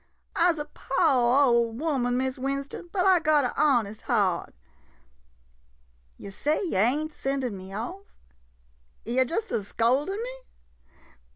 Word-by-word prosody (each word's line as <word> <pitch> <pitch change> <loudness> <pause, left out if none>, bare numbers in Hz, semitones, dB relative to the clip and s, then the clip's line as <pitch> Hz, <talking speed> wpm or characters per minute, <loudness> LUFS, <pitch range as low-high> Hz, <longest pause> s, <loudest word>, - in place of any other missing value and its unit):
I 350 -1 +4
'se 325 - -6
a 295 - -4
po' 270 -2 +2
ole 235 -1 +3
woman, 250 -3 -1
Miss 260 0 -2
Winston, 275 +5 -4
but 375 -2 0
I 375 -2 +5
got 305 -2 +3
a 250 - -1
honest 230 -8 +1
heart. - - 0 1.6
Yo' 200 - -9
say 300 +10 0
yo' 320 - -1
ain't 295 +9 +1
sendin' 270 -6 -2
me 190 0 -10
off— 350 - -6 0.9
yo' 245 +4 +2
just 430 - -3
a - - 0
scoldin' 260 - 0
me? - - -7
270 Hz, 135 wpm, -26 LUFS, 240-315 Hz, 1.6 s, I